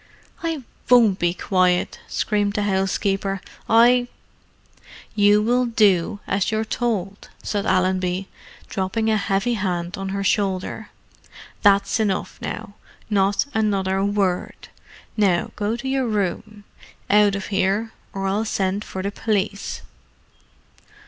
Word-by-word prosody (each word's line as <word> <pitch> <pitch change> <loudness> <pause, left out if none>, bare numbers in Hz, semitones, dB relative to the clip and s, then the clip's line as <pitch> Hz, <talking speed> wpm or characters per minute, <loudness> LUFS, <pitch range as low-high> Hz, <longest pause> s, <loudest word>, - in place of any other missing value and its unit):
"I 325 -5 -3 0.3
won't 230 -6 +5
be 175 0 +1
quiet!" 185 -2 +1
screamed 205 -2 0
the 210 -1 0
housekeeper. 195 0 0 0.3
"I——" 245 +2 +5 1.1
"You 205 0 +4
will 245 +2 +2
do 205 -4 +2
as 195 -1 0
you're 220 0 -1
told," 210 -5 -3
said 205 -2 -2
Allenby, 185 0 +1 0.4
dropping 220 +4 -1
a 215 - +3
heavy 200 +3 0
hand 185 -2 -2
on 195 0 -4
her 195 0 -2
shoulder. 195 +1 -1 0.7
"That's 200 +1 +3
enough, 205 -4 -1
now: 200 - -5 0.4
not 195 0 +2
another 195 -3 +1
word. 200 -3 -1 0.5
Now 195 -5 +2
go 210 +2 -1
to 240 +3 -6
your 265 -1 0
room. 210 0 -2 0.4
Out 205 -1 +4
of 200 - -5
'ere, 200 +3 +1 0.2
or 195 0 -4
I'll 200 +3 0
send 200 -1 -1
for 190 -2 -6
the 200 - -2
police." 205 -1 -2
200 Hz, 120 wpm, -22 LUFS, 190-215 Hz, 1.1 s, won't